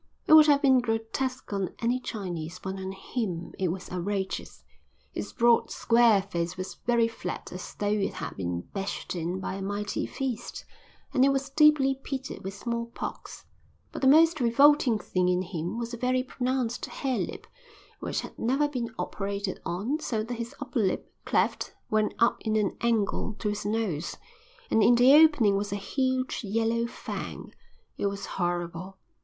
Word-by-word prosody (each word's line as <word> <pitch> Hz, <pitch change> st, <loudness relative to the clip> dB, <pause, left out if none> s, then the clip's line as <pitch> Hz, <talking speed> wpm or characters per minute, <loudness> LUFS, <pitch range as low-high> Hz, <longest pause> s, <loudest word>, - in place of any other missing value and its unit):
It -, -, +5 dB
would 310 Hz, -1 st, +9 dB
have 285 Hz, -1 st, +4 dB
been 260 Hz, -2 st, +6 dB
grotesque 235 Hz, +2 st, -2 dB
on 195 Hz, -2 st, -2 dB
any 240 Hz, +2 st, 0 dB
Chinese, 180 Hz, -8 st, -5 dB
but 190 Hz, +1 st, -5 dB
on 190 Hz, 0 st, -4 dB
him 190 Hz, -3 st, -4 dB
it 190 Hz, -, +1 dB
was 180 Hz, +2 st, -4 dB
outrageous. 190 Hz, +2 st, -3 dB, 0.5 s
His -, -, -5 dB
broad, 235 Hz, -2 st, +3 dB
square 230 Hz, -4 st, +4 dB
face 175 Hz, -2 st, -3 dB
was 185 Hz, 0 st, -5 dB
very 235 Hz, -1 st, +4 dB
flat 205 Hz, -5 st, -6 dB
as 180 Hz, -, -8 dB
though 205 Hz, -, -3 dB
it 210 Hz, -2 st, 0 dB
had -, -, -5 dB
been 85 Hz, -2 st, -3 dB
bashed 195 Hz, -, -5 dB
in 175 Hz, +2 st, -2 dB
by 190 Hz, -, -4 dB
a 195 Hz, -, -5 dB
mighty 205 Hz, +1 st, -2 dB
fist, 260 Hz, -5 st, -4 dB, 0.5 s
and 255 Hz, -, +4 dB
it 275 Hz, -, +6 dB
was 275 Hz, 0 st, -1 dB
deeply 300 Hz, -2 st, +5 dB
pitted 270 Hz, -1 st, -5 dB
with 190 Hz, +1 st, -5 dB
smallpox; 235 Hz, +2 st, -5 dB, 0.5 s
but -, -, -6 dB
the 265 Hz, -, +4 dB
most 320 Hz, +3 st, +6 dB
revolting 255 Hz, 0 st, +5 dB
thing 185 Hz, -3 st, 0 dB
in 180 Hz, 0 st, +1 dB
him 175 Hz, +2 st, -4 dB
was 235 Hz, 0 st, -4 dB
a -, -, -4 dB
very 255 Hz, +1 st, +1 dB
pronounced 255 Hz, -2 st, -2 dB
harelip 265 Hz, -3 st, -3 dB, 0.5 s
which -, -, -2 dB
had -, -, -10 dB
never 270 Hz, +5 st, +2 dB
been 245 Hz, -5 st, -3 dB
operated 200 Hz, -1 st, -3 dB
on, 215 Hz, -, -1 dB
so 225 Hz, -8 st, -2 dB
that 235 Hz, +3 st, -5 dB
his 235 Hz, +4 st, -5 dB
upper 285 Hz, -3 st, -3 dB
lip, 195 Hz, -4 st, -1 dB
cleft, -, -, 0 dB, 0.2 s
went 215 Hz, 0 st, +1 dB
up 235 Hz, -, +3 dB
in 220 Hz, -1 st, -1 dB
an 210 Hz, -3 st, +1 dB
angle 220 Hz, -2 st, 0 dB
to 210 Hz, -, -2 dB
his 205 Hz, 0 st, -3 dB
nose, 205 Hz, -8 st, -2 dB, 0.5 s
and 225 Hz, -, +4 dB
in 235 Hz, +4 st, +6 dB
the 250 Hz, +3 st, +7 dB
opening 295 Hz, -10 st, +6 dB
was 205 Hz, +1 st, -2 dB
a -, -, -1 dB
huge 260 Hz, +5 st, -1 dB
yellow 230 Hz, +3 st, 0 dB
fang. -, -, -7 dB, 0.5 s
It -, -, +1 dB
was 200 Hz, 0 st, -4 dB
horrible. 175 Hz, +1 st, -3 dB
225 Hz, 170 wpm, -28 LUFS, 195-255 Hz, 0.5 s, would